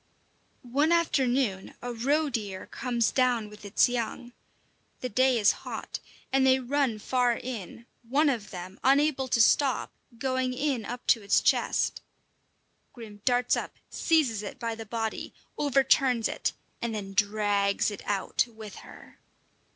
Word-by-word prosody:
One 280 +6 +1
afternoon 260 - +1
a 245 0 -5
roe 285 +7 +1
deer 205 -5 -4
comes 235 -3 -1
down 245 -5 +1
with 210 0 -13
its 205 - +3
young. 240 0 -4 0.7
The 255 - -3
day 255 +3 +3
is 210 - +5
hot, - - -6 0.3
and 270 0 +4
they 265 0 +5
run 260 -2 0
far 245 +2 +1
in, 235 -2 -7 0.2
one 275 +6 +2
of 230 -7 -1
them, 185 +1 -8
unable 275 0 +3
to 240 - +1
stop, 265 +3 +3 0.3
going 260 0 -1
in 260 -4 -1
up 245 +2 -6
to 230 - +4
its 200 0 +3
chest. - - +1 0.9
Grim 215 -4 -11
darts 245 -1 +3
up, - - -5 0.2
seizes 275 -10 +2
it 205 - -7
by 230 -2 -3
the 225 -1 -8
body, 225 0 -4 0.2
overturns 265 -4 +3
it, - - -2 0.3
and 235 -2 -2
then 195 -2 -5
drags 205 0 +1
it 205 - -7
out 205 +3 0
with 220 -3 -10
her. - - -14
240 Hz, 145 wpm, -28 LUFS, 215-265 Hz, 0.9 s, is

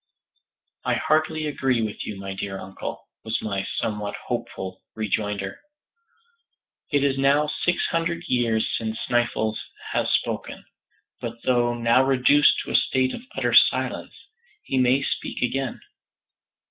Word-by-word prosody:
"I - - +1
heartily 155 0 +1
agree 135 -5 0
with 105 -1 -4
you, 100 - -5
my 95 0 -5
dear 95 0 -4
uncle," 95 0 -7 0.2
was 110 0 -1
my 100 -3 -2
somewhat 105 -1 -2
hopeful 95 0 -4
rejoinder. 105 -2 -2 1.3
"It 145 -1 +3
is 135 -1 +1
now 140 +2 +4
six 175 +3 0
hundred 170 0 -1
years 115 -4 +2
since 110 0 -3
Sneffels 120 -3 0 0.3
has - - +1
spoken, - - -1 0.5
but 115 0 -6
though 120 -1 +2
now 120 +2 +4
reduced 135 +2 +5
to - - -5
a - - 0
state 130 0 +3
of - - -6
utter - - 0
silence, - - +4 0.5
he 130 - 0
may 130 +2 +3
speak - - -2
again. 135 +2 -1
120 Hz, 135 wpm, -24 LUFS, 110-135 Hz, 1.3 s, reduced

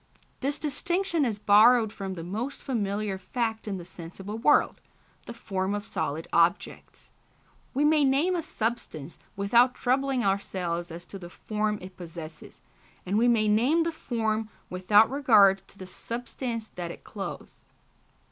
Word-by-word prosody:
This 280 +2 -1
distinction 340 +2 -1
is 220 -4 -1
borrowed 215 +2 +5
from 195 -2 -5
the 165 - -6
most 220 +10 -4
familiar 205 -5 -2
fact 225 +3 -3
in 195 -2 -2
the 175 - -8
sensible 185 +5 -8
world 295 +5 +3 0.5
the - - -6
form 195 -3 -2
of 205 - -4
solid 160 -6 -3
objects. 170 +2 0 0.6
We 290 +2 +3
may 305 -1 +4
name 285 +7 +2
a 345 - 0
substance 215 - -4 0.2
without 235 +6 +3
troubling 265 0 +1
ourselves 180 -3 -1
as 170 +1 -9
to 195 - -9
the 175 -1 -9
form 210 +2 -2
it 185 0 -11
possesses, 165 -2 -10 0.4
and 190 - -1
we 230 +3 +4
may 225 -3 +3
name 250 +11 +3
the 335 - -1
form 225 -7 -2 0.2
without 205 +4 +5
regard 215 -8 +5
to - - -16
the 185 - -8
substance 230 +3 -5
that 175 -1 -6
it - - -10
clothes. 200 -2 -8
215 Hz, 150 wpm, -27 LUFS, 190-245 Hz, 0.6 s, borrowed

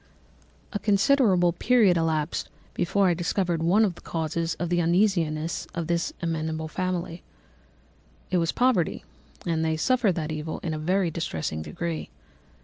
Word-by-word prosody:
"A 205 - -1
considerable 200 -4 +3
period 215 -1 +4
elapsed 160 -1 -1 0.2
before 195 +3 +2
I 175 - +4
discovered 175 0 -1
one 190 +7 +4
of 190 - -1
the - - -15
causes 165 0 -2
of 175 - -3
the 175 0 +2
uneasiness 170 -3 +1
of 170 -1 -2
this 170 +1 0
amiable 160 -1 -2
family: 175 0 -3 1.1
it 185 - +3
was 165 -1 +1
poverty, 245 -10 +1 0.4
and 165 -2 0
they 160 0 0
suffered 235 0 +2
that 160 -2 -3
evil 155 +1 -4
in 165 - -2
a 155 - -3
very 180 +2 +1
distressing 80 - -3
degree. 170 - -4
170 Hz, 145 wpm, -26 LUFS, 160-185 Hz, 1.1 s, period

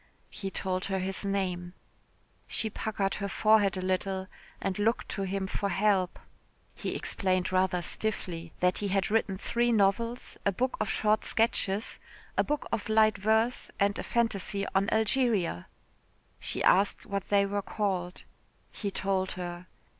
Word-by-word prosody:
He 195 - -4
told 185 -1 -2
her 195 -1 -1
his 190 +1 -2
name. 185 -3 -2 0.7
She 220 - -1
puckered 200 -3 -1
her 200 - -1
forehead 210 -1 +4
a 185 - -3
little, 190 0 -1 0.3
and 190 +1 -2
looked 225 +3 +1
to 200 - -3
him 195 0 -1
for 200 +1 -2
help. 195 -3 +2 0.6
He - - -4
explained 185 -1 0
rather 185 -1 +2
stiffly 170 -7 -2
that 180 0 +3
he 205 - -1
had 195 0 0
written 210 -3 +1
three 240 +4 +1
novels, 230 +3 +1
a 200 - +3
book 255 +7 -1
of 215 - -1
short 215 0 +2
sketches, 220 -2 +1 0.4
a - - +3
book 295 0 -2
of 225 -1 -2
light 215 -1 +4
verse, 220 +4 +2
and 200 0 +3
a - - -3
phantasy 205 -4 0
on 195 +1 +2
Algeria. 220 - +2 0.7
She - - -2
asked 195 +2 +3
what 200 -1 -4
they 200 -1 +4
were 200 +1 -1
called. 190 -3 -2 0.5
He 205 - -3
told 190 -1 -1
her. 175 0 -6
200 Hz, 155 wpm, -29 LUFS, 185-215 Hz, 0.7 s, forehead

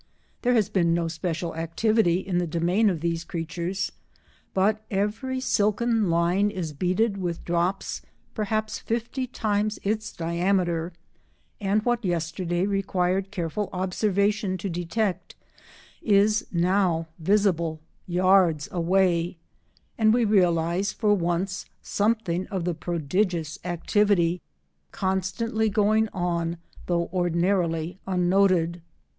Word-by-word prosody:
There 245 0 +2
has 215 -4 +3
been 170 -3 +2
no 170 -1 0
special 165 0 -3
activity 175 +3 +1
in 185 -2 -1
the 175 - -1
domain 175 +7 +2
of 170 -5 -2
these 170 0 -1
creatures, 170 +3 -3 0.6
but 210 +3 +1
every 215 +7 -1
silken 220 -2 +1
line 175 +5 +2
is 170 -6 -4
beaded 185 +7 0
with 175 -3 -4
drops 175 +3 -1 0.3
perhaps 215 0 -2
fifty 235 +3 -3
times 215 -3 -1
its 215 +2 -1
diameter, 175 0 0 0.7
and 205 +1 +1
what 240 -1 +1
yesterday 175 0 -1
required 195 -1 0
careful 190 +1 -3
observation 200 +2 0
to 190 +2 -4
detect 175 +1 -2 0.7
is 210 +1 +3
now 175 -2 +1
visible 170 -3 +1 0.3
yards 180 -4 +3
away, 175 -1 +1 0.6
and 220 0 +5
we 240 -1 +3
realise 180 -2 +2
for 210 -2 +2
once 185 +1 -1 0.2
something 205 -4 0
of 190 -3 -3
the 175 - 0
prodigious 170 0 -1
activity 175 0 +1 0.5
constantly 190 +4 -1
going 215 +1 +2
on 170 -2 -1 0.3
though 170 -1 +1
ordinarily 175 -1 0
unnoted. 180 -2 +2
185 Hz, 110 wpm, -25 LUFS, 170-205 Hz, 0.7 s, and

